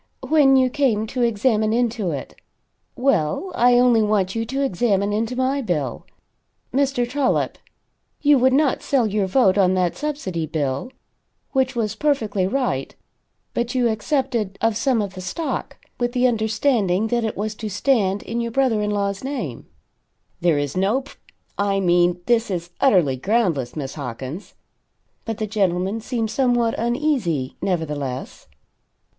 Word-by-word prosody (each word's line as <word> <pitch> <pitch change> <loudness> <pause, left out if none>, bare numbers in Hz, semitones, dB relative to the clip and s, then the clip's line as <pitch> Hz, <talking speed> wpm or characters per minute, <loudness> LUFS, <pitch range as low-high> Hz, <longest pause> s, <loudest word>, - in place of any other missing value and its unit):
When 290 -4 +5
you 260 -1 +3
came 245 -7 +1
to 250 +3 -4
examine 220 -1 +2
into 230 -5 0
it. 140 -4 -5 0.6
Well, 250 - 0
I 245 0 +4
only 245 -2 +5
want 205 -3 +1
you 225 0 -2
to 270 +3 -1
examine 200 -3 +1
into 225 +3 -1
my 260 +2 0
bill. 150 - -3 0.7
Mr. 270 -2 +1
Trollop, 265 +1 0 0.6
you 290 -2 +4
would 260 +1 +4
not 280 0 +2
sell 265 -4 +1
your 205 -2 0
vote 195 -2 +3
on 185 -1 +4
that 180 -2 +1
subsidy 195 - -3
bill 145 - -2 0.6
which 265 -1 +1
was 215 -3 -1
perfectly 220 -8 0
right 255 +3 -2 0.6
but 240 +2 -2
you 245 -2 +3
accepted 230 -3 -1
of 225 -1 +1
some 240 -1 +1
of 195 -1 -6
the 185 - -8
stock, 295 - -4 0.2
with 240 0 -1
the 250 0 +2
understanding 220 -3 +1
that 240 0 0
it 220 - -3
was 215 +2 -2
to 215 0 -6
stand 205 -2 +1
in 235 +1 -3
your 235 - -2
brother 235 -3 +1
in 210 - -1
law's 200 0 -1
name." 250 - -5 0.7
"There 170 -3 +2
is 145 -1 -2
no 200 +8 +1
pr 275 - -14 0.5
I 200 -1 +1
mean, 175 -1 +2
this 235 -2 +2
is, 175 -2 -4
utterly 175 - +4
groundless, 170 - 0
Miss 140 -3 -4
Hawkins." 135 - -7 0.7
But 225 -2 -3
the 215 - -2
gentleman 195 0 0
seemed 225 -2 -2
somewhat 240 -3 +2
uneasy, 235 - 0
nevertheless. 150 -8 -3
220 Hz, 150 wpm, -22 LUFS, 185-250 Hz, 0.7 s, When